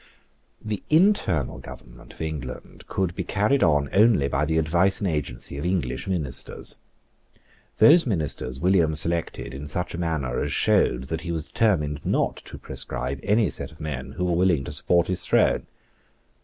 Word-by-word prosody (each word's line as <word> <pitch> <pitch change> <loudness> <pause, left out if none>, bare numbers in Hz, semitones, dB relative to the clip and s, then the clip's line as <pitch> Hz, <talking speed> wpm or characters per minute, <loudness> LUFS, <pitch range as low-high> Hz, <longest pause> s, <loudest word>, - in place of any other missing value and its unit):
The 105 -2 -3
internal 155 - +2
government - - -12
of - - -12
England 75 -5 -6
could 95 -3 -1
be 95 - -3
carried 105 +9 +1
on 75 -3 +3
only 105 -9 +4
by 70 +2 0
the 80 +1 0
advice 85 +5 +2
and 100 - -1
agency 70 -4 -3
of - - -4
English 85 -8 -2
ministers. 70 -8 -2 1.0
Those 165 0 +6
ministers 75 - -2
William 85 -3 +3
selected 85 -5 -1
in 70 +2 -7
such 90 +3 -3
a 85 - -5
manner 80 -8 -1
as - - -3
showed - - +2
that 80 -1 -3
he 85 - -4
was 80 -2 -3
determined 75 -11 0
not - - 0
to - - -9
proscribe 65 +2 -4
any 105 +2 +2
set - - -4
of 75 - -18
men 75 -4 -5
who 90 - -2
were 90 -1 +1
willing 85 -5 +2
to - - -6
support 85 +4 +2
his 90 - -3
throne. - - +2
80 Hz, 170 wpm, -24 LUFS, 70-95 Hz, 1.0 s, Those